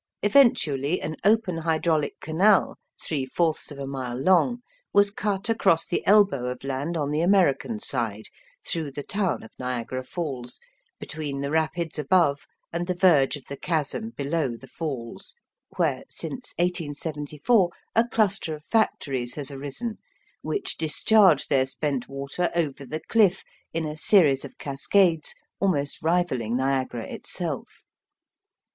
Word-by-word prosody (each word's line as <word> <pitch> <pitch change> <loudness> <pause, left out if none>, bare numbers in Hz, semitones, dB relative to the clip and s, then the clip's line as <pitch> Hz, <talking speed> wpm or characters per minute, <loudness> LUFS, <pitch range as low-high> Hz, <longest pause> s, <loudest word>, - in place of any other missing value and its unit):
Eventually, 180 - +3
an 155 - -4
open 205 -4 +3
hydraulic 160 -1 0
canal, 190 +6 +3 0.2
three 145 -4 -2
fourths 160 +4 -1
of 145 - -8
a 140 - -5
mile 130 -3 -4
long, 190 - +3 0.3
was 200 0 +5
cut 200 -1 -2
across 195 -7 +3
the - - -2
elbow 195 -11 +4
of 125 +1 -5
land 140 +5 -2
on 145 -2 -1
the 150 +2 +1
American 190 +3 +2
side, 115 - -3 0.4
through 155 -5 -2
the 145 - -5
town 190 - -1
of 110 - -12
Niagara 125 0 -3
Falls, 130 -5 -5 0.4
between 145 -3 -5
the 140 0 -3
rapids 160 0 -1
above 150 -2 +2 0.3
and 170 +1 -2
the 180 - -1
verge 160 -7 +4
of 135 - -16
the 140 - -6
chasm 165 +8 -2
below 140 -4 -1
the 135 - -13
Falls, 135 - -6 0.4
where, - - +1
since 255 -1 -5
1874, 160 +2 0 0.3
a 230 +1 +4
cluster 200 -8 +1
of 150 0 -15
factories 135 - 0
has 145 -1 -2
arisen, 145 - -4 0.4
which 395 -2 -3
discharge 170 +1 +4
their 130 -1 +2
spent 135 -2 -2
water 140 +6 -2
over 145 -5 -1
the 155 +4 -4
cliff 200 -3 +3 0.3
in 165 0 -2
a 150 0 -4
series 155 -5 +4
of 140 - -10
cascades 160 +4 +1 0.2
almost 145 -8 0
rivalling 155 -9 0
Niagara 130 -3 -1
itself. - - -5
155 Hz, 140 wpm, -25 LUFS, 135-185 Hz, 0.4 s, was